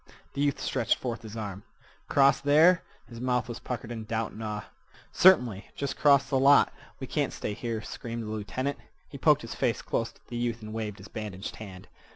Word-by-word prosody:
The 140 - -2
youth 145 -1 +1
stretched 120 -4 +1
forth 120 -3 -4
his 110 -1 -9
arm. 100 -3 -5 0.5
"Cross 140 0 +4
there?" 160 +5 +5 0.3
His 115 -1 -10
mouth 125 -1 0
was 120 0 -6
puckered 120 -2 -5
in 110 -2 -5
doubt 110 0 -2
and 110 - -8
awe. 105 -1 -3 0.5
"Certainly. 125 - +5
Jest 140 - -3
'cross 140 -2 +5
th' 140 - -9
lot! 140 +1 +6 0.3
We - - -4
can't - - -1
stay 105 - -4
here," 115 0 -4
screamed 115 0 -6
the - - -6
lieutenant. 130 +6 -3 0.3
He - - -10
poked - - +4
his - - -6
face - - -1
close - - -1
to - - -26
the 120 - -5
youth 120 -1 -2
and 110 0 -7
waved 110 -2 -4
his - - -11
bandaged 105 -3 -6
hand. 95 -3 -10
115 Hz, 200 wpm, -28 LUFS, 110-135 Hz, 0.5 s, lot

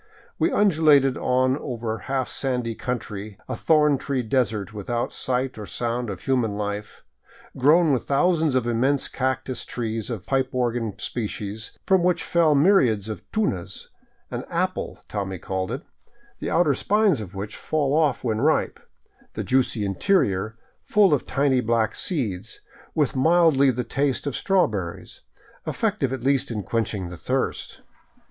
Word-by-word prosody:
We - - +2
undulated 155 -9 +4
on 130 +1 +1
over 115 -4 -3
half 130 +1 -2
sandy 125 -4 -2
country, 105 -4 -5
a 130 - -3
thorn 150 0 +3
tree 135 -3 -2
desert 115 -4 0
without 115 +3 -3
sight 130 -1 -2
or 105 - -7
sound 120 0 -2
of 95 -3 -6
human 120 -6 0
life, 105 0 -5 0.5
grown 150 +4 +4
with 125 - -1
thousands 160 0 +2
of 130 -2 +2
immense 130 +4 +1
cac 130 -1 -1
tus 130 -2 -4
trees 115 -2 -3
of 110 -6 -4
the - - -29
pipe 130 -1 +1
organ 120 -4 -1
species 110 -2 -4
from 190 -2 +4
which 180 0 +2
fell 165 -3 +3
myriads 130 - +3
of 110 - -5
tunas, 100 - -2 0.4
an - - -3
" - - -25
apple - - -2
" - - -44
Tommy 95 -3 -3
called 95 +1 -3
it, - - -4 0.6
the - - -3
outer 165 -4 +3
spines 205 - +2
of 100 -2 -9
which 105 +2 -5
fall 145 -3 -1
off 155 -4 +2
when 110 -2 0
ripe, 155 +3 +1 0.5
the - - -3
juicy 125 -5 +1
interior, 105 - +1 0.2
full 205 -5 +4
of 145 - 0
tiny 135 -1 +2
black 115 -1 +1
seeds, 115 - -2 0.3
with 150 -4 +1
mildly 155 -1 +4
the 125 -1 -1
taste 135 +3 -1
of 140 - -2
strawberries, 110 - -1 0.5
effective 205 - 0
at 130 -3 -4
least 135 0 +2
in 110 -4 -3
quenching 105 -5 -2
the 90 - -8
thirst. - - -2
125 Hz, 155 wpm, -24 LUFS, 110-145 Hz, 0.6 s, undulated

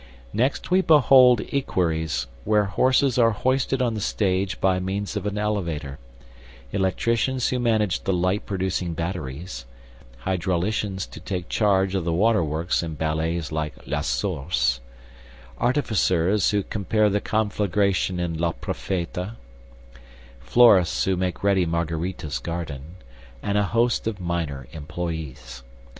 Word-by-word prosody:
"Next 130 - 0
we 185 +1 +5
behold 130 - +6
equeries, 80 - 0 0.2
whose 105 +3 +3
horses 130 +3 +2
are 115 -1 +6
hoisted 130 +4 0
on 120 -2 0
the 110 - -4
stage 95 -2 0
by 95 -1 +2
means 100 +2 -3
of 105 0 -2
an 105 0 -3
elevator; 85 -10 -2 0.7
electricians 115 +6 0
who 125 - -1
manage 110 -5 +1
the - - 0
light 95 +3 0
producing 95 -3 -2
batteries; 80 -6 -5 0.6
hydrauliciens 95 +2 -1
to - - -9
take 90 -3 -5
charge 95 -3 +2
of 95 -3 0
the 85 - -1
water 105 +1 +3
works 80 +3 -1
in 80 -2 -5
ballets 80 +1 -1
like 75 -3 -3
La - - -2
Source; 65 -5 0 0.8
artificers 105 - +2
who 105 -2 +1
prepare 105 +2 +1
the 105 0 +1
conflagration 100 -4 0
in 85 -2 -2
Le 85 -1 +1
Profeta; 90 +2 -4 1.1
florists 95 - +5
who 95 - +1
make 90 0 -3
ready 100 -2 +3
Margarita's 80 -3 -2
garden, 80 +1 -6 0.5
and 100 - -1
a 105 0 +3
host 115 +3 +1
of 105 -3 -3
minor 80 -7 -3
employees. 75 -6 -6
95 Hz, 130 wpm, -24 LUFS, 85-105 Hz, 1.1 s, behold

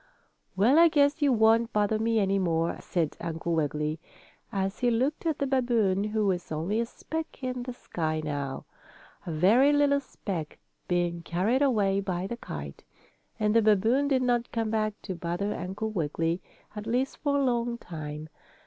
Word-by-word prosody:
] - - -45
"Well, 245 - +5
I 340 - +8
guess 290 0 +2
you 285 -2 +4
won't 225 0 +4
bother 210 +1 +1
me 225 +1 +1
any 195 -1 +2
more," 165 -2 0
said 165 -4 -2
Uncle 170 0 -3
Wiggily, 150 0 -1 0.5
as 195 0 -2
he 245 - +2
looked 260 +8 0
at 315 -3 0
the 280 - 0
babboon, 235 -7 +1
who 215 0 0
was 180 -4 -1
only 170 +8 -1
a 235 - 0
speck 320 +2 -6
in 255 -1 -2
the 250 0 -5
sky 155 -9 -3
now; 145 -3 -4 0.6
a - - -2
very 210 - +5
little 290 -1 +3
speck, 185 - -6 0.3
being 175 -1 0
carried 190 - 0
away 205 -8 +2
by 185 -2 -2
the 235 +4 -4
kite. 75 - -8 0.6
And 210 0 +1
the 230 - +6
babboon 220 +6 +3
did 265 -2 +2
not 240 -1 +1
come 225 -2 -1
back 215 -1 -1
to 190 - -4
bother 175 +4 -2
Uncle 195 +5 -4
Wiggily, 165 -1 -1 0.3
at 210 +1 -6
least 250 +4 0
for 285 -1 0
a 280 - +2
long 240 -2 0
time. 155 -6 -7
210 Hz, 175 wpm, -28 LUFS, 175-245 Hz, 0.6 s, I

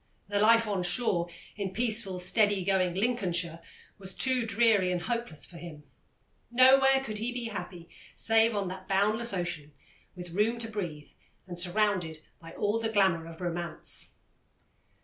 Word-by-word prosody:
The 205 0 0
life 230 +2 +5
on 200 -3 -1
shore, 180 -2 +1 0.3
in 195 -2 -4
peaceful, 215 -5 0
steady 200 +2 +2
going 185 -2 +1
Lincolnshire, 180 -7 -1 0.4
was 190 -1 -4
too 255 -3 +1
dreary 215 -4 +3
and 180 - 0
hopeless 235 -8 -3
for 175 - -12
him; 160 -3 -10 0.7
nowhere 270 +2 +5
could 215 -5 -5
he 230 +3 -2
be 245 -2 -4
happy 175 -5 -7 0.3
save 225 0 +3
on 200 -2 -1
that 185 0 -8
boundless 215 +4 +2
ocean, 175 -6 -4 0.4
with 175 -1 -9
room 210 +6 +1
to 230 -1 -4
breathe, 170 -8 -5 0.3
and 175 -2 -5
surrounded 180 -4 0 0.2
by 165 0 -11
all 210 +2 0
the 225 0 -1
glamour 190 -6 +2
of 165 +1 -11
romance. 175 -2 -4
195 Hz, 150 wpm, -29 LUFS, 175-225 Hz, 0.7 s, life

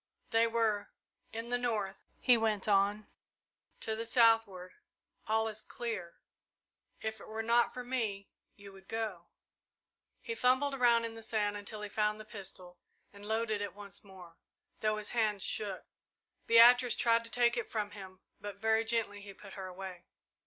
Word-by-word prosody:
"They 225 0 +4
were 225 -3 0 0.4
in 230 +1 -5
the 245 0 +1
north," 215 -6 -2
he 250 - +6
went 220 -3 0
on. 205 +1 +3 0.8
"To 220 - -2
the 225 +1 -4
southward 225 -6 +3 0.5
all 220 +1 +2
is 215 -1 -4
clear. 215 -8 -5 0.9
If 220 0 -4
it - - -11
were 220 +1 -4
not 235 +1 +3
for 250 - -6
me 225 -6 -2 0.3
you 200 -1 -12
would 190 0 -16
go." 215 -6 -4 0.9
He 460 - -5
fumbled 270 - +2
around 240 -3 +4
in 230 - -5
the 225 - -9
sand 210 -2 -1
until 210 +1 -5
he 210 - -5
found 210 0 0
the 215 - -9
pistol 190 -4 -7 0.3
and 200 +1 -11
loaded 220 -1 0
it 200 -3 -4
once 200 -2 -9
more, 180 -4 -14 0.4
though 215 0 +1
his 215 - -4
hands 215 -4 +1
shook. 200 -3 -2 0.6
Beatrice 240 +1 +7
tried 230 0 +3
to - - -6
take 240 0 +3
it 240 - -3
from 210 -2 -2
him, 190 -2 -11 0.2
but 205 -1 -6
very 220 +2 +2
gently 225 -3 0
he 200 -1 -10
put 200 -2 -12
her 190 -1 -6
away. 185 -1 -8
215 Hz, 165 wpm, -33 LUFS, 200-230 Hz, 0.9 s, Beatrice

